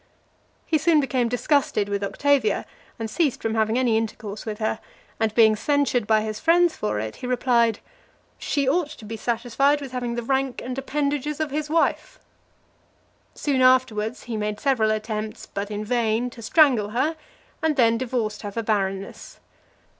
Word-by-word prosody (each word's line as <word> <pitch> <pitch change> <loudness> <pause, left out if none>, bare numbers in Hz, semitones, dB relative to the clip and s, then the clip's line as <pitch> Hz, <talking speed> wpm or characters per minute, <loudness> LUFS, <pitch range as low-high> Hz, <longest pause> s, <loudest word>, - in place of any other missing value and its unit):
He 315 - +1
soon 315 0 +4
became 260 -4 0
disgusted 245 -4 +1
with 200 0 -2
Octavia, 260 0 +1 0.3
and 225 - -3
ceased 280 +4 0
from 225 - -2
having 220 +1 +1
any 245 -4 +2
intercourse 215 -1 -5
with 215 -1 -3
her; 220 0 -1 0.4
and 220 -1 +1
being 220 -2 +6
censured 255 -1 +1
by 220 -1 +4
his 215 0 -4
friends 345 +1 +3
for 105 0 -2
it, 110 0 -5
he 250 - -6
replied, 240 -3 +2 0.6
"She 280 -3 -1
ought 300 +2 +1
to 225 - -11
be 225 +2 -5
satisfied 245 +5 +1
with 275 -3 -8
having 245 -2 -3
the 240 - -3
rank 265 +1 -1
and 250 0 -5
appendages 290 +2 -2
of 310 -2 -2
his 300 +1 -3
wife." 335 +9 0 1.2
Soon 275 -3 0
afterwards, 255 -4 +2
he 230 -2 -4
made 210 0 -3
several 255 -6 +2
attempts, 215 0 -3
but 200 +1 -5
in 210 0 -4
vain, 235 +1 0
to 235 - -11
strangle 245 -5 +4
her, 270 +9 0 0.5
and 320 -2 +1
then 230 -3 +3
divorced 230 -4 -2
her 205 - -5
for 230 +3 -3
barrenness. 195 -2 -3
235 Hz, 170 wpm, -24 LUFS, 215-275 Hz, 1.2 s, being